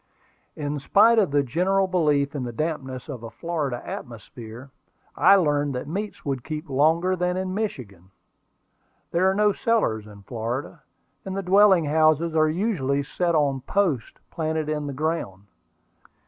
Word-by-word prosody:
In 145 -1 -3
spite 220 +10 +5
of 200 - +2
the 145 0 +2
general 185 +9 +1
belief 150 -6 +1
in 145 - -3
the 120 - -4
dampness 130 -1 -4
of 135 -6 -7
a 115 - -7
Florida 150 -7 -3
atmosphere, 120 +2 -9 0.4
I 200 - +6
learned 145 -6 +1
that 125 - -4
meats 200 +7 -5
would 135 -4 -2
keep 155 -1 -6
longer 165 +7 +2
than 180 0 -1
in 185 0 -3
Michigan. 115 - -5 1.0
There 180 +3 +3
are 190 - 0
no 210 0 +3
cellars 115 - 0
in 100 -1 -14
Florida, 120 - -5 0.4
and 190 0 -5
the 195 - -2
dwelling 190 -2 +5
houses 155 +2 +2
are 155 0 +4
usually 155 - 0
set 170 +4 -1
on 140 -3 +1
posts 165 - -1
planted 160 -1 -2
in 150 -1 -2
the 140 - -4
ground. 145 - -3
155 Hz, 155 wpm, -24 LUFS, 135-180 Hz, 1.0 s, I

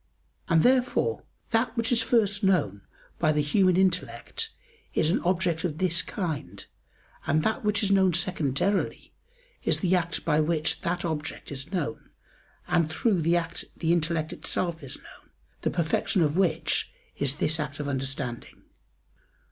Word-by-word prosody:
And 165 -2 +4
therefore 255 - +2 0.3
that 230 +2 +1
which 230 +1 +1
is 235 - +3
first 205 -3 +2
known 140 - +2 0.4
by 155 -3 +3
the 150 -1 +1
human 185 +4 +3
intellect 190 - +1 0.5
is 160 - +3
an - - +2
object 175 -2 0
of 160 -4 -2
this 170 -2 +2
kind, 140 - -5 0.6
and 155 +2 +2
that 220 - 0
which 210 0 +1
is 200 - +2
known 190 -2 +4
secondarily 175 +1 0 0.5
is - - +1
the 185 -2 +3
act 175 -1 -1
by 150 +1 +3
which 155 0 0
that 175 +2 -2
object 160 -2 -4
is 140 +4 -5
known; 150 -5 -3 0.6
and 170 -2 +2
through 185 +3 +1
the 170 +2 +3
act 170 0 -3
the 165 0 +2
intellect 165 -2 0
itself 170 -2 -2
is 135 - -6
known, - - -17 0.3
the - - +1
perfection 170 +2 +1
of 150 0 +1
which 165 -4 +1 0.3
is 140 -1 0
this 160 +2 +1
act 145 -1 -4
of 145 - -3
understanding. 135 -3 -4
170 Hz, 155 wpm, -27 LUFS, 150-190 Hz, 0.6 s, And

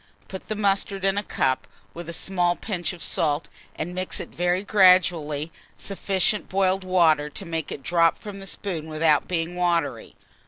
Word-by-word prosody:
Put 190 - -8
the 215 - -1
mustard 195 -1 0
in 195 0 +2
a 205 - +1
cup, 130 -9 -1 0.3
with 170 0 -8
a - - -3
small 175 0 0
pinch 180 -5 -3
of 175 -3 -8
salt, 150 -3 0 0.3
and 170 +3 -4
mix 185 0 -2
with - - -5
it - - -21
very 180 +2 +1
gradually 175 -6 +3 0.3
sufficient 195 +1 0
boiled 190 0 +1
water 165 -5 +3
to 195 - -8
make 165 -3 -4
it 135 - -6
drop 165 -1 +3
from 205 -2 -9
the 195 - -9
spoon 170 -6 -4
without 155 -1 +2
being 170 0 -2
watery. 175 -1 -1
180 Hz, 180 wpm, -24 LUFS, 165-195 Hz, 0.3 s, gradually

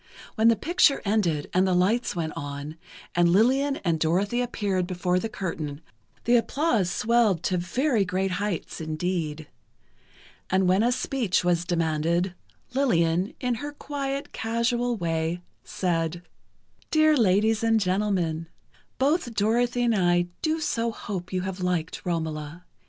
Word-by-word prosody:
When 220 0 +3
the 230 - +6
picture 300 - +3
ended 180 -8 +1
and 185 +1 +3
the 185 - +2
lights 205 +7 +1
went 160 -2 -2
on, 145 +2 -6 0.4
and 175 0 +3
Lillian 260 +9 +3
and 165 -2 +1
Dorothy 195 +9 +1
appeared 200 -7 -1
before 180 0 0
the 225 - -3
curtain, 155 -8 -4 0.4
the 240 +1 +4
applause 235 - +1
swelled 215 -3 +2
to 185 - 0
very 235 - +1
great 190 +1 -1
heights 205 -5 -3
indeed. 160 -1 -3 1.0
And 190 0 +2
when 185 +3 +4
a 240 +2 +3
speech 245 -7 0
was 175 -1 +2
demanded, 170 +1 0 0.4
Lillian, 180 -9 +1
in 250 -2 0
her 290 0 -5
quiet, 280 -1 -4
casual 235 +2 0
way, 165 -1 -1 0.2
said: 170 -1 -2 0.7
"Dear 310 -1 +4
ladies 215 -1 +3
and 225 -1 +3
gentlemen, 185 -5 0 0.5
both 275 -3 +1
Dorothy 240 +4 +1
and 235 -1 +3
I 175 -2 +2
do 315 0 0
so 235 -6 -1
hope 190 -5 -6
you 185 -1 -1
have 190 0 -4
liked 180 -3 -2
'Romola. 160 0 -3
190 Hz, 140 wpm, -26 LUFS, 170-235 Hz, 1.0 s, the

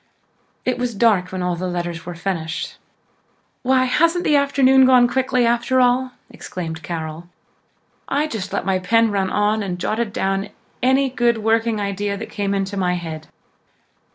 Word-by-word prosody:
It 250 -1 0
was 245 -2 -2
dusk 195 -4 +2
when 185 -1 -3
all 180 -1 0
the 185 +2 -4
letters 175 -2 -4
were 175 - -5
finished. 165 -2 -4 0.8
"Why, 260 0 +3
hasn't 335 +7 +2
the 300 - +3
afternoon 275 -2 +4
gone 250 -2 +6
quickly 255 0 +1
after 240 +2 +2
all!" 250 +1 +2 0.2
exclaimed 160 -3 -6
Carol. 160 0 -6 0.8
"I 290 +2 0
just 220 -10 -5
let - - -2
my 190 -1 +1
pen 225 +4 +2
run 195 -2 0
on 210 +1 +1
and 185 -3 -3
jotted 215 +4 -2
down 195 +1 -1 0.3
any 265 +1 +2
good 240 -2 +2
working 225 0 +1
idea 200 0 -2
that 225 - -8
came 200 -2 -1
into 195 +1 -2
my 180 -2 +1
head. 160 -3 -6
210 Hz, 160 wpm, -20 LUFS, 180-250 Hz, 0.8 s, gone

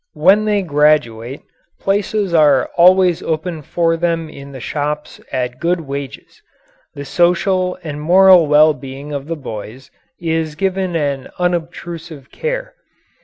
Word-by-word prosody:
When 210 +2 +4
they 205 -2 +1
graduate, 145 -6 +1 0.4
places 200 -1 -1
are 145 -5 +4
always 180 0 +5
open 160 0 -3
for 165 +3 0
them 165 -1 -1
in 140 -1 -11
the 135 - -9
shops 150 +3 -4
at 125 0 -3
good 175 +1 0
wages. 140 -2 -8 0.5
The 140 0 -7
social 180 +3 +1
and 150 -2 -6
moral 180 0 +6
well 150 +1 +5
being 135 +2 -9
of 140 0 -5
the 165 - -3
boys 125 -1 -9 0.3
is 160 -2 -2
given 190 0 -1
an 140 -4 -2
unobtrusive 170 -4 -4
care. - - -4
160 Hz, 130 wpm, -17 LUFS, 145-180 Hz, 0.5 s, moral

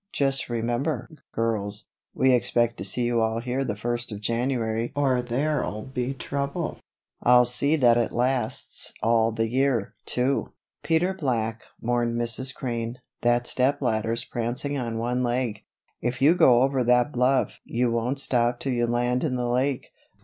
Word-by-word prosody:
Just 135 -2 0
remember, 120 +4 -1 0.2
girls, 105 -2 -2 0.3
we 130 -1 +4
expect 120 -1 +1
to - - -3
see 105 +5 0
you 120 -1 +1
all 110 0 0
here 125 +3 -2
the 105 - -3
first 120 +2 -3
of 105 - -5
January 115 0 -1
or 135 -3 +2
there'll 125 -3 -1
be 130 0 -3
trouble 140 +5 -3 0.4
I'll 125 0 +6
see 140 +5 +3
that 120 -5 +4
it 115 - 0
lasts 125 -2 0
all 115 0 +3
the 115 0 -1
year, 125 -3 0
too." 130 +3 0 0.3
"Peter 165 +3 +1
Black," 115 -9 -2
warned 120 0 0
Mrs. 120 +2 -1
Crane, 120 -2 -4 0.2
"that 120 0 +2
step 130 +3 +1
ladder's 115 -1 -1
prancing 120 +4 -3
on 120 -4 -3
one 120 +2 -1
leg. 120 -3 -1 0.4
If 120 +1 -2
you 145 +4 +6
go 125 -8 +5
over 135 -1 +1
that 125 +3 +3
bluff 130 +1 +1
you 120 0 0
won't 120 +4 -1
stop 120 -2 +1
till 135 - -2
you 120 -1 +1
land 120 +1 0
in 140 -5 0
the 125 -1 -1
lake. 130 +2 -1
120 Hz, 160 wpm, -25 LUFS, 115-130 Hz, 0.4 s, I'll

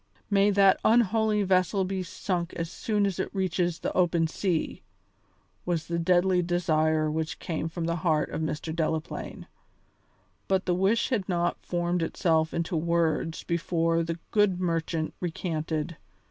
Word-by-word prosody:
"May 200 0 +4
that 195 -1 +5
unholy 220 -2 +3
vessel 185 +1 +2
be 190 0 -2
sunk 175 -1 -3
as 165 0 -4
soon 210 0 0
as 195 -3 -2
it - - -1
reaches 175 -3 0
the - - -3
open 170 -2 +2
sea!" 165 0 -2 0.8
was 170 -3 -1
the 170 0 -2
deadly 180 +1 +3
desire 160 -3 +1
which 160 +1 -2
came 165 -1 -3
from 165 0 -4
the 170 +1 -1
heart 155 -2 +1
of - - -3
Mr. 155 0 -3
Delaplaine. 160 -1 -3 1.0
But 190 0 +1
the 180 - +1
wish 195 +6 +2
had 205 -7 -1
not 175 -1 0
formed 175 0 -1
itself 160 -1 +1
into 170 +1 -2
words 165 0 0
before 165 -1 0
the 165 0 -3
good 205 -4 +3
merchant 165 -2 -1
recanted. 160 -2 -3
170 Hz, 145 wpm, -27 LUFS, 165-185 Hz, 1.0 s, that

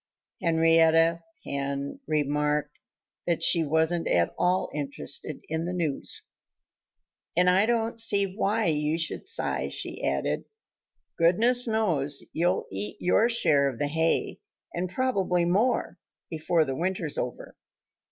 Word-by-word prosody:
Henrietta 165 0 +3 0.2
Hen 140 - -4
remarked 150 0 -1 0.5
that 170 -2 0
she 170 -2 +4
wasn't 160 +3 0
at 85 -1 +1
all 180 +1 0
interested 145 0 -3
in 160 +1 -3
the 180 - -3
news. 165 -6 -2 1.1
"And 180 0 +4
I 190 +4 +4
don't 230 -1 0
see 200 -4 +3
why 215 +1 0
you 150 0 0
should 165 - -3
sigh," - - +1
she - - -4
added. - - -1 0.7
"Goodness 230 +9 +4
knows 165 -11 0
you'll 175 +3 0
eat 100 +2 -3
your 220 +6 +2
share 145 -12 +3
of 130 - -8
the 145 +2 -2
hay 160 +2 0 0.3
and 175 +1 -3
probably 190 -6 0
more 210 +9 0 0.3
before 160 0 +1
the 135 -2 -4
winter's 170 -2 -2
over." 125 - -6
165 Hz, 125 wpm, -26 LUFS, 150-185 Hz, 1.1 s, she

